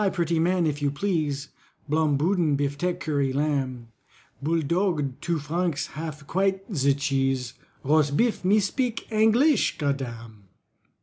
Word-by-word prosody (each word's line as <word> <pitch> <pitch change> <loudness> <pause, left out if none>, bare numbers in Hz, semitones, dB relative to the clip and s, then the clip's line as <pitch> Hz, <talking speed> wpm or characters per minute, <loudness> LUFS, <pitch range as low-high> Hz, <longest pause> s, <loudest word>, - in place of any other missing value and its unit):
pretty 170 -2 0
man, 175 +1 +2
if 150 -1 -1
you 145 - +2
please, 145 -3 -2 0.4
Blom 150 -1 +2
boodin, 165 -2 +2
biftek, 145 +6 -1
currie 140 -5 0
lamb, 135 -4 -1 0.5
Bouldogue, 160 -1 0
two 170 0 -1
franc 160 +2 -1 0.2
half, 150 0 -6
quite 190 +3 0
ze 140 -1 +3
cheese, 135 -3 -1 0.3
Rosbif, 155 - +2
me 200 +4 +4
spik 230 +4 -2
Angleesh, 225 +5 +3
godam." 115 -7 -4
150 Hz, 120 wpm, -25 LUFS, 140-180 Hz, 0.5 s, me